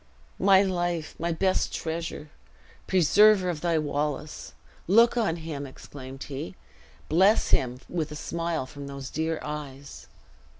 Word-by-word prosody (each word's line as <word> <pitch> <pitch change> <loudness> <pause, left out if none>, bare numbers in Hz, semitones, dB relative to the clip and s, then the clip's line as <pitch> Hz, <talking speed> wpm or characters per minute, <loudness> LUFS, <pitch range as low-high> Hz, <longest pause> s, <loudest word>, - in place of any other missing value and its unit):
"My 195 0 +6
life! 175 -4 -1
My 170 +1 -1
best 185 +3 +1
treasure! 160 -2 -4 0.6
Preserver 190 +2 +5
of 155 -3 -6
thy 170 -2 +1
Wallace! 150 0 -3 0.3
Look 230 +7 +5
on 220 -9 +1
him!" 155 -4 -6
exclaimed 135 0 -10
he; 135 -10 -6 0.5
"bless 190 +7 +4
him 125 0 +1
with 160 -3 -3
a - - -6
smile 165 -1 -2
from 140 +2 -9
those 140 -2 -7
dear 160 +1 -1
eyes." 145 -2 -7
160 Hz, 130 wpm, -27 LUFS, 145-175 Hz, 0.6 s, My